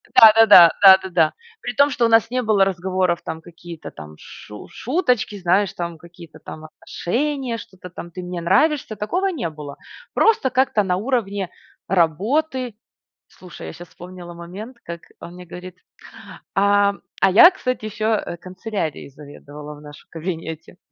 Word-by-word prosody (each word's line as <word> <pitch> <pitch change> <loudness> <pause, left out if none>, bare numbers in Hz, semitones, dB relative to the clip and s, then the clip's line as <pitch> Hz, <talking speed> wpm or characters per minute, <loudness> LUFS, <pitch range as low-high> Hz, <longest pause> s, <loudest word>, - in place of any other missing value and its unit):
Да 220 -1 +10
да 225 0 +6
да 175 -5 +9
да 190 -1 +10
да 190 - -6
да. 165 -3 +2 0.3
При 245 - -5
том, 285 +1 +4
что 245 -3 0
у - - +2
нас 225 0 +4
не 255 0 0
было 215 -4 +3
разговоров, 185 -1 -1
там, 160 0 -6
какие-то 170 -1 -11
там 75 0 -12
шу 105 0 -12
шуточки, 250 - -1
знаешь, 185 +2 +1
там 170 -2 -5
какие-то 170 -1 -15
там 155 0 -10
отношения, 240 - -3
что-то 185 -4 -12
там: 175 0 -10
"Ты 180 +1 -8
мне 180 -1 -6
нравишься"- 250 - +1
такого 350 - -2
не 280 - -3
было. 150 -2 -10 0.4
Просто 435 -12 +2
как-то 255 -5 +1
на 180 -1 0
уровне 205 -5 -2 0.4
работы. 225 - 0 0.5
Слушай, 180 -2 -12
я - - -8
щас 175 -1 -12
вспомнила 175 -1 -11
момент, 195 +9 -10
как 170 0 -7 0.2
он 170 - -10
мне 180 0 -11
говорит 180 +1 -10 0.8
А, 200 0 +3 0.3
а 195 - +4
я, 345 - +8
кстати, 255 - -4
еще, 215 0 -4
э, 215 -5 -1
канцелярией 185 -5 -5
заведовала 145 +1 -12
в - - -15
нашем 150 0 -14
кабинете. 165 0 -7
185 Hz, 165 wpm, -21 LUFS, 170-225 Hz, 0.8 s, Да